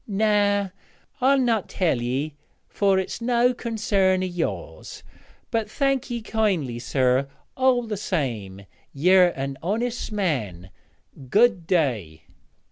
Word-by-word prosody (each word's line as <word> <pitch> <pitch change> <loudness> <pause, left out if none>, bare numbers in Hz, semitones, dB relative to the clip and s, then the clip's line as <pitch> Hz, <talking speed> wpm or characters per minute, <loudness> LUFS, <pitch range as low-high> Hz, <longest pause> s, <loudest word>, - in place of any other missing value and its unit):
'Noä, 205 -2 +1 0.5
I'll 275 +2 +4
not 235 -6 +1
tell 160 -10 0
ye, 135 +5 -2 0.3
fur 195 -2 +2
it's 190 +4 -3
no 245 +1 +2
concern 200 -6 0
o' - - 0
yours; 175 -2 -5 0.5
but 225 -3 -1
thank 275 +2 0
ye 235 -2 -4
kindly, 185 - -1
sir, 130 +1 +1 0.3
all 255 -2 +3
the 220 -3 -4
same. 115 - -3 0.3
Yer 180 +5 +5
an 135 0 -4
honest 230 +7 -2
man. 110 - -2 0.6
Good 210 - +3
day.' 115 - 0
190 Hz, 120 wpm, -24 LUFS, 135-225 Hz, 0.6 s, Yer